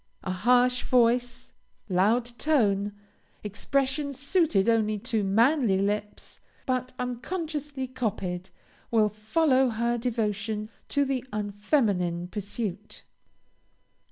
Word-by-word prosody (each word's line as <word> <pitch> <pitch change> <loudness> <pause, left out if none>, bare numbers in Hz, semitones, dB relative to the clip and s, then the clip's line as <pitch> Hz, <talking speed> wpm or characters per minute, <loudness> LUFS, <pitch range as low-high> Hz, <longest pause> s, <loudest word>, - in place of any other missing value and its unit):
A 185 - -2
harsh 245 +6 +3
voice, 245 0 +1 0.3
loud 210 +6 +2
tone, 205 -10 +2 0.5
expressions 275 +6 -1
suited 285 - +2
only 215 -2 +2
to 225 0 -1
manly 225 +2 +3
lips, 205 +1 -3 0.3
but 255 -1 -1
unconsciously 285 +2 -4
copied, 195 -8 -3 0.4
will 220 -2 +3
follow 255 +6 +2
her 235 +1 0
devotion 215 -2 -2 0.2
to 285 -1 +2
the 265 -2 -1
unfeminine 205 - 0
pursuit. 205 0 -5
230 Hz, 95 wpm, -27 LUFS, 205-255 Hz, 0.5 s, harsh